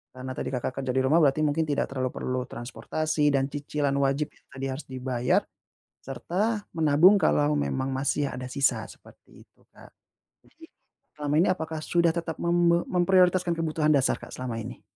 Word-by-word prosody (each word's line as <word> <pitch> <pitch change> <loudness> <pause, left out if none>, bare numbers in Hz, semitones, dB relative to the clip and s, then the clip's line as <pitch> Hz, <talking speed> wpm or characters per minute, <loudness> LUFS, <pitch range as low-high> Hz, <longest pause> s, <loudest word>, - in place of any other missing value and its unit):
karena 130 0 -6
tadi - - -4
Kakak 125 +1 -3
kerja 130 -1 -2
di 130 - +3
rumah 150 +6 +4
berarti 150 -1 +3
mungkin 155 +2 +1
tidak 145 -2 -1
terlalu 130 -2 -2
perlu 130 0 -2
transportasi 150 +6 -2
dan 135 0 0
cicilan 145 0 -2
wajib 140 +2 0 0.2
tadi 135 0 -7
harus 135 +4 -6
dibayar, 130 -1 0 0.6
serta 190 - -2
menabung 160 +5 +5
kalau 145 -4 +2
memang 135 -1 -2
masih 140 +1 -1
ada 125 0 -6
sisa 135 +2 0
seperti - - -17
itu, - - -38 0.2
Kak. - - -16 0.5
Jadi, 325 - -22 0.5
selama 145 -1 -3
ini 175 - +4
apakah 160 -3 -2
sudah 170 +1 +2
tetap 165 -1 -4
membe 170 0 +2
memprioritaskan 180 -1 +2
kebutuhan 155 -2 +1
dasar, 135 - +1
Kak, - - -10
selama 120 -3 -4
ini? 110 - -8
145 Hz, 165 wpm, -26 LUFS, 130-165 Hz, 0.6 s, menabung